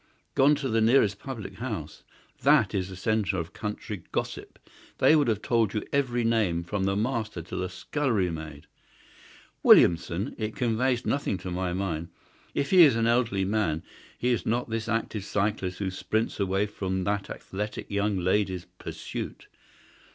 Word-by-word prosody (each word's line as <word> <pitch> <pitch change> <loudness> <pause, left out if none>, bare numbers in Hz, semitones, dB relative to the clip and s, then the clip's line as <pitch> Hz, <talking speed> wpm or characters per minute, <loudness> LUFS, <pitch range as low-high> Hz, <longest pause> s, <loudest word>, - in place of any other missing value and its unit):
"Gone 140 +3 +5
to 140 -2 -3
the 115 -2 +1
nearest 110 -4 +4
public 110 -8 -7
house. 105 -11 -5 0.4
That - - +4
is 95 -1 -1
the 95 - -8
centre 105 0 0
of 80 +1 -4
country 105 -2 -5
gossip. - - -4 0.4
They 155 - +6
would 145 -4 +3
have 110 -3 0
told 115 -4 +1
you 105 - -1
every 125 -4 +1
name, 105 -7 +1
from 95 +2 -2
the 95 0 +1
master 110 -4 -2
to 85 - -8
the 95 0 -2
scullery 105 - -1
maid. 80 -3 -7 1.0
Williamson! 85 +6 +5
It 110 0 -3
conveys 125 +1 +1
nothing 140 -8 0
to 90 0 -6
my 90 0 -1
mind. 85 -3 -2 0.5
If 140 - -1
he 185 -2 +8
is 145 -8 +7
an 115 0 +1
elderly 115 -5 +2
man 95 -6 0 0.3
he 125 - 0
is 120 - 0
not 120 +1 -1
this 115 0 -2
active 115 -3 -1
cyclist 100 -2 -1
who 95 -2 -2
sprints 110 +4 -2
away 95 +1 +1
from 95 -2 -3
that 100 +1 -1
athletic 105 +2 -5
young 100 0 +1
lady's 95 0 0
pursuit. - - -6
105 Hz, 165 wpm, -27 LUFS, 95-115 Hz, 1.0 s, he